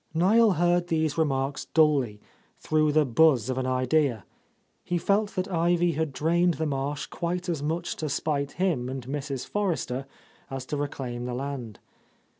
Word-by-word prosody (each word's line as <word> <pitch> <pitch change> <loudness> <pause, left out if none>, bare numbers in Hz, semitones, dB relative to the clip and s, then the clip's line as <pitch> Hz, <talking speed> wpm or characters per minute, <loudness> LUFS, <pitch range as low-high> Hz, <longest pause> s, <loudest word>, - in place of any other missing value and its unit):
Niel 210 +5 +5
heard 175 +1 +2
these 160 -3 0
remarks 140 -3 0
dully, 140 -9 +2 0.4
through 155 -1 +1
the 155 0 +3
buzz 130 -2 +3
of 130 - -2
an 130 - -1
idea. 130 - +1 0.6
He 175 - -1
felt 205 +4 +1
that 185 0 -1
Ivy 175 -1 +2
had 160 -1 -1
drained 170 +4 +2
the 160 - -2
marsh 140 -1 -2
quite 175 +6 -3
as 165 -5 -2
much 165 +4 -2
to 155 - -3
spite 140 0 -1
him 165 -10 0
and 130 -2 -5
Mrs. 135 -1 -4
Forrester 160 -10 -2 0.4
as 135 -1 -5
to 145 - -3
reclaim 130 -4 -4
the 125 -1 -3
land. 130 -5 -5
150 Hz, 160 wpm, -27 LUFS, 135-170 Hz, 0.6 s, Niel